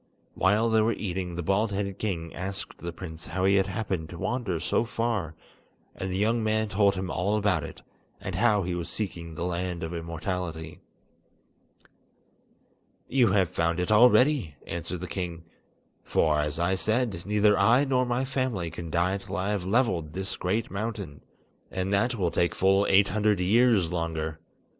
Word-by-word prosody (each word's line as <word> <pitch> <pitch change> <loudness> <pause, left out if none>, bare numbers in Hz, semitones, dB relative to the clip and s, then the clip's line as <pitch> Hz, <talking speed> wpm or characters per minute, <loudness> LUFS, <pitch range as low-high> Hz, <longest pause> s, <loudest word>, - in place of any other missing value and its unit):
While 105 +4 +2
they 110 -1 +4
were 115 +2 +2
eating, 90 -4 -4
the 85 - -3
bald 100 +5 +1
headed 100 -1 -3
king 85 -6 -3
asked 95 +4 -5
the 85 - -5
prince 85 -2 -8
how 95 0 -1
he 100 - +4
had 95 0 +2
happened 95 -5 -3
to 85 - -8
wander 105 -4 -2
so 85 +6 +1
far, 115 -8 -2 0.6
and 95 - -4
the 90 - -1
young 110 +3 +1
man 110 0 +1
told 100 0 +3
him 95 -1 -3
all 100 +5 0
about 105 -2 +1
it, - - -9 0.4
and - - -5
how 105 -4 +3
he 90 0 -2
was 85 -1 -3
seeking 85 -6 -4
the 85 - -3
Land 90 -1 -3
of 80 +1 -4
Immortality. 85 -1 -4 2.3
"You 120 -7 +3
have 95 -4 +3
found 85 +1 0
it 90 +3 -1
already," 125 - +5
answered 85 +1 -5
the - - -3
king, 85 -2 -4 0.6
"for, 75 -2 +2
as 75 0 -1
I 85 +2 +2
said, 110 -1 0
neither 105 0 +3
I 125 +7 +4
nor 130 -2 +2
my 125 +1 0
family 130 -10 -2
can 85 -1 -7
die 90 +4 +1
till 100 0 -6
I 95 +2 -1
have 95 -3 -2
levelled 95 - +1
this 95 0 -3
great 105 +5 -1
mountain; 100 -7 -5 0.5
and 95 +1 -2
that 120 +5 +2
will 90 -6 0
take 85 - +1
full 95 +1 +3
eight 100 +1 +5
hundred 105 0 +2
years 100 -2 +3
longer. 80 -2 -3
95 Hz, 175 wpm, -27 LUFS, 85-110 Hz, 2.3 s, already